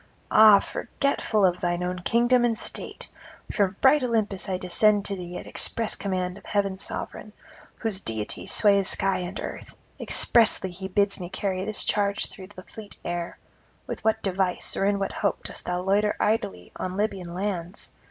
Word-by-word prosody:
ah, 215 -2 +9
forgetful 215 -2 0
of 180 -1 +1
thine 175 0 -1
own 180 0 -3
kingdom 240 +6 +3
and 235 -2 +1
state! - - -5 0.4
From 200 -2 +1
bright 275 +2 +6
Olympus 215 -6 0
I 185 - 0
descend 205 +3 +2
to 200 - 0
thee 180 -1 -7
at - - -8
express 225 -2 -1
command 185 -1 -3
of - - -21
heaven's 195 -2 -1
sovereign, 215 - -5 0.4
whose 220 -5 -1
deity 110 - -2
sways 200 -2 +4
sky 195 -1 +2
and 180 +2 -5
earth; - - -7 0.2
expressly 215 -5 +3
he 190 +2 -6
bids 200 +1 +1
me 175 -1 -6
carry 190 0 -2
this 215 0 -3
charge 200 0 0
through 190 -2 -11
the 185 -2 -12
fleet 210 +1 -10
air: 175 0 -4 0.5
with - - -6
what 220 0 +1
device 190 -1 0
or 195 - 0
in 200 0 +2
what 195 0 -2
hope 200 -3 -1
dost - - -7
thou 180 0 -1
loiter 205 +3 +2
idly 95 - -1
on 185 +1 -4
Libyan 195 -5 -2
lands? 185 -1 -4
195 Hz, 170 wpm, -26 LUFS, 180-210 Hz, 0.5 s, ah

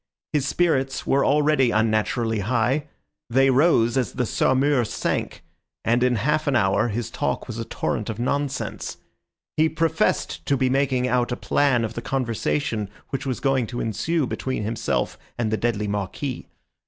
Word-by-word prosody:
His 145 -2 +1
spirits 135 -7 +1
were 140 +1 +3
already 145 -2 +3
unnaturally 110 +1 +1
high; 125 +7 0 0.4
they 135 +3 +4
rose 130 -4 +4
as 130 - 0
the 125 - 0
Saumur 130 +3 +2
sank, 110 - -2 0.4
and 120 +2 +3
in 125 0 +3
half 150 +7 0
an 140 - +2
hour 100 -1 +3
his 115 +1 -3
talk - - -2
was 115 -2 -5
a 115 - -3
torrent 110 -1 -2
of 110 - -4
nonsense. 140 +3 -2 0.6
He 160 +1 +4
professed 160 0 0
to 140 - +2
be 130 -1 +1
making 130 -2 +1
out 125 -1 +1
a 120 - -1
plan 130 -5 +2
of 110 - -5
the 120 - -5
conversation 115 -3 -1 0.2
which 135 0 -3
was 130 - -2
going 135 -4 +1
to 120 +1 -5
ensue 155 - 0
between 130 -2 -3
himself 110 +1 -1 0.2
and 115 -2 -1
the - - +2
deadly 105 -3 -1
Marquis. 105 +7 -3
125 Hz, 165 wpm, -24 LUFS, 115-140 Hz, 0.6 s, they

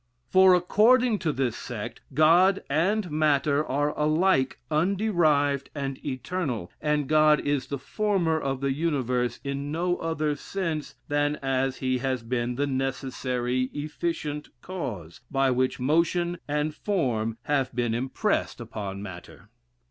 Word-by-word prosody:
For 185 -1 +7
according 220 +5 +4
to 160 - 0
this 130 -4 -1
sect. - - -6
God 175 +6 +5
and 180 +5 +1
matter 150 -1 +2
are 145 +1 -1
alike 155 -2 +2
underived 155 -6 +2
and 135 -2 -4
eternal, 130 - -3
and 150 -2 0
God 155 0 +5
is 145 -2 -1
the 140 - -3
former 175 +1 0
of 135 -2 -3
the 140 -1 +1
universe 125 -6 -1
in 140 +1 -3
no 175 +3 0
other 155 -2 -1
sense 165 -1 -4
than 145 0 +1
as 135 0 0
he 130 -1 0
has 130 -2 -2
been 120 +1 -2
the 140 +3 0
necessary 130 -2 -1
efficient 150 0 -3
cause, 105 - -6
by 135 -1 +2
which 130 +1 0
motion 170 +5 +1
and 150 +1 -1
form 120 - -1
have 135 -3 0
been 120 -2 0
impressed 130 - -1
upon 100 -4 -6
matter. 90 -4 -10
145 Hz, 135 wpm, -26 LUFS, 130-165 Hz, -, For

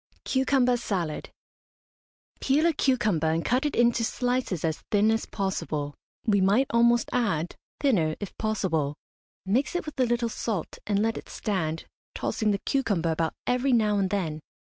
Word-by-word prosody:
CUCUMBER 260 -2 +2
SALAD. 180 -9 -3 1.1
Peel 285 +4 +2
a 335 - +4
cucumber 215 - +1
and 165 +1 0
cut 255 +4 +2
it 295 - -4
into 235 -1 +3
slices 245 - -1
as 160 -1 -1
thin 210 +1 +4
as 225 - -1
possible. 155 -7 -2 0.3
We 205 -3 +3
might 205 +8 +4
almost 235 0 +4
add, 185 -10 0 0.2
thinner 175 - +2
if 205 - -6
possible. 175 -10 0 0.5
Mix 245 - +1
it 355 - -1
with 305 -3 -8
a 255 - +4
little 240 0 +1
salt, 220 -5 -3
and 205 0 +2
let 225 +1 0
it - - -14
stand, 165 -7 -2 0.3
tossing 215 - -1
the 200 - +2
cucumber 200 - 0
about 160 0 -1
every 250 +2 +2
now 210 -3 +3
and 190 -1 +1
then. 170 -6 -2
215 Hz, 160 wpm, -27 LUFS, 175-245 Hz, 1.1 s, a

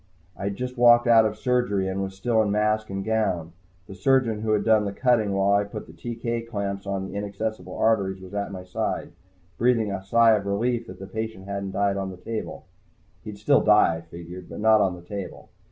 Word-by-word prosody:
I'd 100 0 -3
just 125 +2 -5
walked 120 0 +7
out 115 -2 +6
of 105 0 -2
surgery, 120 -7 0
and 95 +1 -2
was 95 0 -4
still 110 +3 +1
in 105 - 0
mask 105 +1 +1
and 95 0 -4
gown. 95 -7 -1 0.3
The 95 - -10
surgeon 115 +2 +2
who 110 0 0
had 105 - +1
done 110 -2 +3
the 100 - -2
cutting 115 -2 +2
while 95 0 +2
I 100 - +5
had 100 0 -4
put 105 - -8
TK 115 0 -4
clamps 100 -2 -4
on 95 -1 -2
the 95 - -8
inaccessible 105 +2 -4
arteries 100 -4 +1
was 95 +1 -12
at 100 0 -3
my 95 -1 -7
side, 90 0 -3 0.5
breathing 115 -3 +2
a 95 -1 -4
sigh 115 +3 +5
of 105 -2 +1
relief 115 +4 -1
that 90 - -9
the 95 - -8
patient 110 -1 -5
hadn't 100 -1 -4
died 100 0 +1
on 95 -1 -3
the 95 - -9
table. 110 +4 -6 0.6
He'd 105 -1 -8
still 135 +7 +3
die, 105 -6 +4
I - - -9
figured, 85 +2 -10
but - - -8
not 110 0 +5
on 95 -3 +1
the 90 - -13
table. 100 +1 -7
100 Hz, 220 wpm, -25 LUFS, 95-110 Hz, 0.6 s, walked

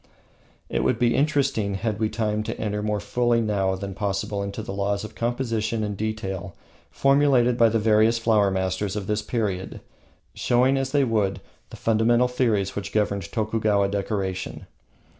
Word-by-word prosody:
It - - -1
would 65 - +2
be 120 0 +2
interesting, 135 -9 +1
had 105 +1 -2
we 110 -1 +1
time, 105 -1 -1
to 115 - -5
enter 105 -1 -2
more 105 0 -1
fully 120 +3 +1
than 110 -2 -1 0.2
it - - +1
is 95 - -6
now 100 -1 -4
possible 100 0 -2
into 100 +2 -4
the 100 - -6
laws 100 +1 -1
of 110 - -8
composition 115 -2 -1
and 105 -1 -3
detail 100 -3 -4 0.3
formulated 135 -3 +3
by 115 -2 +5
the 115 - +1
various 110 +1 +3
flower 110 -3 +3
masters 95 +1 -1
of 105 -2 -3
this 105 +2 -1
period, 105 -4 -3 0.5
showing, 125 +2 +2
as 135 -1 -1
they 145 -1 +3
would, 105 -6 0 0.3
the - - -10
fundamental 115 +2 +3
theories 115 -6 0
which 100 0 -4
governed 100 -4 -1
Tokugawa 105 -2 +1
decoration. 100 -2 -3
110 Hz, 170 wpm, -24 LUFS, 100-115 Hz, 0.5 s, by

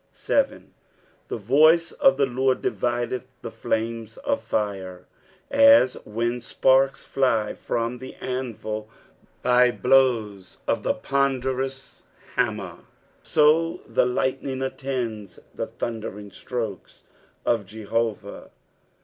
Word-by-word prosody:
7. - - -1 0.2
" - - -35
TAe - - -3
tout 155 - +4
of 275 -2 +5
the 140 - +3
Lord 130 0 +1
divideth 120 +1 -1 0.2
the - - -5
fiamtt 115 0 -3
of 280 0 -1
fire" 95 -4 -3 0.5
As 280 - +7
when 120 +3 -2
eparka 135 +2 +2
fly 115 -6 +1
from 120 +1 -3
the 130 +1 -9
anvil 115 -4 -4 0.6
bj 125 0 +4
blows 115 -8 +2
of - - 0
a - - +2
ponderous 135 +1 -2 0.3
hammer, 105 -8 -1 0.4
so 165 +3 +3
the - - +2
lightning 130 +1 -1
attends 125 -6 -4 0.2
the - - -4
thundering 105 -3 -6
strokes 110 -3 -6 0.4
of 115 -5 +1
Jehovah. 110 0 -3
125 Hz, 105 wpm, -24 LUFS, 110-135 Hz, 0.6 s, As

